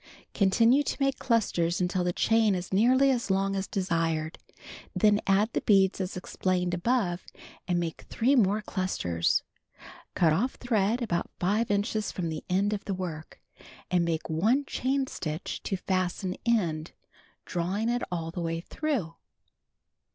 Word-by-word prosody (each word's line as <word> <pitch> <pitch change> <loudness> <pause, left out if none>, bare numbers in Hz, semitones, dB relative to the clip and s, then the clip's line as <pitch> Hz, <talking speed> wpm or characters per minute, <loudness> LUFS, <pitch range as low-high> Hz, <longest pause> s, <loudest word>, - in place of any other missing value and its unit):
Continue 230 +7 +4
to - - -3
make 275 -1 +1
clusters 180 -8 +1
until 180 0 0
the 175 - +1
chain 220 +2 +3
is 180 +1 -5
nearly 255 +7 +4
as 240 -4 -1
long 195 +1 +1
as 195 0 -2
desired. 165 -4 -1 0.6
Then 210 -1 +4
add 205 +4 +3
the - - 0
beads 195 -2 +3
as 180 -1 -4
explained 180 -1 -1
above 180 -2 0 0.4
and 175 -2 +1
make 165 -2 -4
3 255 +5 +2
more 210 -3 +3
clustei 185 - -3
s. 85 - +3 0.7
Cut 165 -3 +4
off 240 +11 0
thread 230 0 0
about 170 -7 -1
5 210 +6 +1
inches 205 +1 0
from 170 -3 -3
the 155 -1 -5
end 195 +3 +2
of 205 - -4
the 195 - -2
work, 165 -4 -7 0.5
and 180 -1 +3
make 165 -1 -2
one 220 - +2
chain 270 +1 0
stitch 160 -8 -5
to 195 - -2
fasten 185 0 -1
end, 170 -9 0 0.5
drawing 185 +6 -1
it 240 +1 0
all 165 -2 -3
the 175 - -5
way 165 0 -2
through. 225 - -2
190 Hz, 155 wpm, -28 LUFS, 175-225 Hz, 0.7 s, Continue